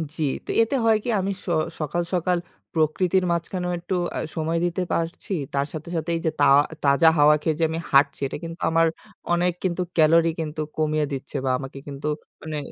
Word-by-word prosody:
জি। 160 - -2 0.2
তো - - -15
এতে 230 +5 +1
হয় 220 -1 +5
কি 245 - -3
আমি 195 +1 -1
স - - -20 0.3
সকাল, 155 +3 -1
সকাল 180 0 +1 0.4
প্রকৃতির 175 +4 +2
মাঝখানেও 180 +1 -2
একটু 180 +2 -3 0.2
আ - - -2 0.2
সময় 165 +1 -1
দিতে 175 +2 -1
পারছি 165 +4 -3 0.2
তার 140 0 +1
সাথে 155 +2 -6
সাথে 160 +1 -2
এই 165 - -2
যে 160 - +2
তা 145 - +5 0.4
তাজা 140 +4 +5
হাওয়া 150 +1 +6
খেয়ে 155 -2 0
যে - - +2
আমি 165 +1 -3
হাঁটছি 140 0 +4
এটা - - -5
কিন্তু 165 +1 -7
আমার 165 0 +4 0.5
অনেক 175 0 +2
কিন্তু 180 0 0 0.2
ক্যালোরি 165 +1 +5
কিন্তু 155 0 -3 0.2
কমিয়ে 155 -1 +1
দিচ্ছে, 135 +2 -6
বা - - +1
আমাকে 135 0 -8
কিন্তু 140 +1 -5 0.3
মানে 155 -1 -5
165 Hz, 195 wpm, -24 LUFS, 150-175 Hz, 0.5 s, হাওয়া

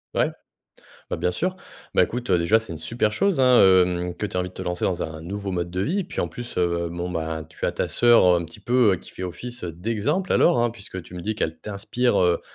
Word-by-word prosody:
Ouais, - - +2 0.8
bah, - - -1
bien 90 - 0
sûr. 185 - -1 0.4
Bah, - - +6
écoute, 120 -2 -4
heu, 90 - +4
déjà, 100 +7 +3
c'est 110 -6 -8
une 80 - -5
super 105 +6 -1
chose 195 - +1
hein, 125 -2 +6
hem, 90 -2 +4
que 105 - -3
tu - - -12
aies 90 - +2
envie 90 0 -2
de - - -21
te - - -7
lancer 90 -1 -2
dans 90 -2 -1
un 80 0 -5
nouveau 100 +3 -5
mode 85 -1 -2
de 90 +1 -2
vie. 185 - 0
Et - - -4
puis - - -6
en - - -1
plus, 120 -1 -8
heu, 85 -1 0
bon 85 +1 -4
ben, 80 -2 -3
tu - - -5
as - - +1
ta - - -2
sœur 120 -4 +5
un 85 -2 +3
petit 80 - -13
peu, 120 0 +3
heu, - - +1
qui - - -13
fait 95 - -8
office 120 +7 -6
heu, 85 - -3
d'exemple 115 - -1
alors 170 -8 +4
hein, 120 - +2
puisque 100 -5 -8
tu 90 - -13
me 90 - -6
dis 110 +3 -2
qu'elle 80 -6 -3
t'inspire 110 +4 0
heu, 90 -1 +2
95 Hz, 270 wpm, -24 LUFS, 85-120 Hz, 0.8 s, Bah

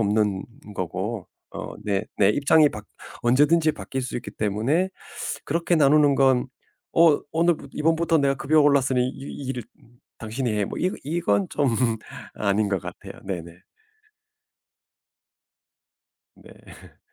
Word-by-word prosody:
없는 105 -2 +1 0.3
거고. 95 +4 -3 0.3
어 - - -6
내 100 -1 0
내 100 0 +5
입장이 145 +5 +4
바 105 - -7 0.4
언제든지 150 +6 +4
바뀔 135 -2 -5
수 125 - -4
있기 120 - -6
때문에 115 - 0 0.6
그렇게 170 +3 +1
나누는 145 -1 +5
건 130 -1 +3 0.5
어 165 -3 +6
"오늘부 165 -3 +1
이번부터 165 +1 +2
내가 140 -1 +2
급여가 155 +3 +3
올랐으니 135 -3 +3
이 140 +1 -8
일을 125 -2 -3 0.6
당신이 115 +2 -3
해." 105 -1 0
뭐 - - -6
이거 185 +2 0
이건 105 - 0
좀 145 -2 0 0.7
아닌 105 0 +1
것 95 -3 -1
같아요. - - -9
네네. 85 -2 -7 2.7
네. - - -16
135 Hz, 240 characters per minute, -24 LUFS, 105-150 Hz, 2.7 s, 어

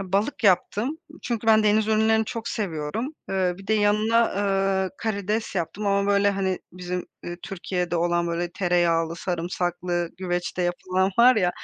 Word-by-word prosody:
balık 200 +6 -1
yaptım. 205 - +2 0.3
Çünkü 230 -2 -3
ben 220 -1 +6
deniz 215 +1 +3
ürünlerini 220 0 +3
çok 230 +1 -5
seviyorum. 205 - -3
Eee, 185 -2 0
bir 195 - -12
de 220 - +2
yanına, 215 +2 +3
ııı, 195 -1 +1
karides 215 0 -2
yaptım 190 +4 -3
ama, 200 0 +2
böyle, 200 0 +4
hani, 190 -2 -1
bizim, 180 0 -5 0.2
ııı, 175 0 -5
Türkiye'de 180 -3 -3
olan, 170 0 +1
böyle, 170 +1 -2
tereyağlı, 170 -2 +1
sarımsaklı, 175 0 -2
güveçte 180 0 -2
yapılan 185 +2 0
var 245 0 +7
ya, 180 -4 +3
195 Hz, 150 wpm, -24 LUFS, 175-215 Hz, 0.3 s, var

